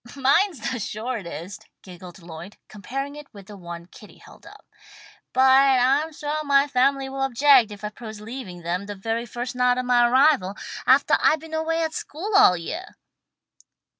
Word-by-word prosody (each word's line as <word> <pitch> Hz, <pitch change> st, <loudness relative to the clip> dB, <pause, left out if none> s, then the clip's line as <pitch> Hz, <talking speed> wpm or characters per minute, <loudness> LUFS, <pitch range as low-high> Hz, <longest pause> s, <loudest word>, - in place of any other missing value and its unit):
"Mine's 275 Hz, -, +1 dB
the 255 Hz, -, -4 dB
shortest," 205 Hz, -, -6 dB, 0.2 s
giggled 180 Hz, -1 st, -12 dB
Lloyd, 170 Hz, +4 st, -10 dB
comparing 270 Hz, +7 st, -6 dB
it 295 Hz, -1 st, -12 dB
with 200 Hz, -2 st, -12 dB
the 205 Hz, -, -12 dB
one 170 Hz, -2 st, -9 dB
that 175 Hz, -, -24 dB
Kitty 210 Hz, -, -15 dB
held -, -, -17 dB
up. -, -, -16 dB, 0.7 s
"But 260 Hz, -, +2 dB, 0.4 s
I'm 275 Hz, +6 st, +2 dB
suah 300 Hz, 0 st, -4 dB
my 280 Hz, -1 st, +3 dB
family 270 Hz, 0 st, +1 dB
will 270 Hz, 0 st, -6 dB
object 270 Hz, -2 st, +4 dB
if 205 Hz, 0 st, -11 dB
I 210 Hz, -, -3 dB
propose 220 Hz, 0 st, -10 dB
leaving 210 Hz, -6 st, -9 dB
them 180 Hz, +4 st, -3 dB
the 205 Hz, -, -6 dB
very 225 Hz, +4 st, -3 dB
first 240 Hz, +3 st, -5 dB
night 250 Hz, 0 st, +2 dB
of 255 Hz, -, -2 dB
my 240 Hz, -1 st, +3 dB
arrival, 255 Hz, -7 st, +3 dB, 0.3 s
aftah -, -, +4 dB
I've 310 Hz, -, +4 dB
been 320 Hz, +1 st, -12 dB
away 325 Hz, +1 st, -1 dB
at 320 Hz, 0 st, -3 dB
school 375 Hz, +9 st, -6 dB
all 180 Hz, -, +6 dB
yeah." 320 Hz, -, -7 dB
245 Hz, 175 wpm, -23 LUFS, 200-280 Hz, 0.7 s, all